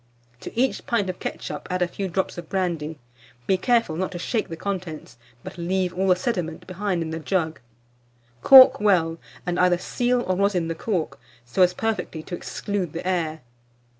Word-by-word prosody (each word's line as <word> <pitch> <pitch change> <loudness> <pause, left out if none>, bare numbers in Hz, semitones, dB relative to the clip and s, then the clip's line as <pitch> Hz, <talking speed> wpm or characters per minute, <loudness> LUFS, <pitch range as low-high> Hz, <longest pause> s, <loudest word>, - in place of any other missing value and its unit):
To 230 - -6
each 265 +1 0
pint 205 -6 +1
of 180 - -16
ketchup - - -5
add 180 0 +1
a - - 0
few 195 +2 -4
drops 190 +1 -2
of 170 - -10
brandy. 165 -5 -2 0.5
Be 190 - +3
careful 230 -4 +1
not 185 +3 -2
to - - -4
shake 220 +5 -2
the 165 - -5
contents, 180 -8 -5 0.3
but - - -9
leave 180 +1 0
all 190 +2 0
the 185 - +5
sediment 180 -6 -3
behind 185 -2 -2
in 160 - -5
the 160 - -3
jug; 160 -1 -1 0.8
cork 265 -1 +9
well, 170 -6 +2 0.3
and 180 0 -1
either 180 -1 +4
seal 245 +6 0
or 185 - 0
rosin 185 -3 +1
the - - -1
cork, 170 -1 -3 0.3
so 120 +10 -1
as 180 0 +5
perfectly 215 -8 -2
to - - -10
exclude 190 -3 -4
the 170 - -5
air. 160 -4 -1
180 Hz, 185 wpm, -24 LUFS, 165-200 Hz, 0.8 s, cork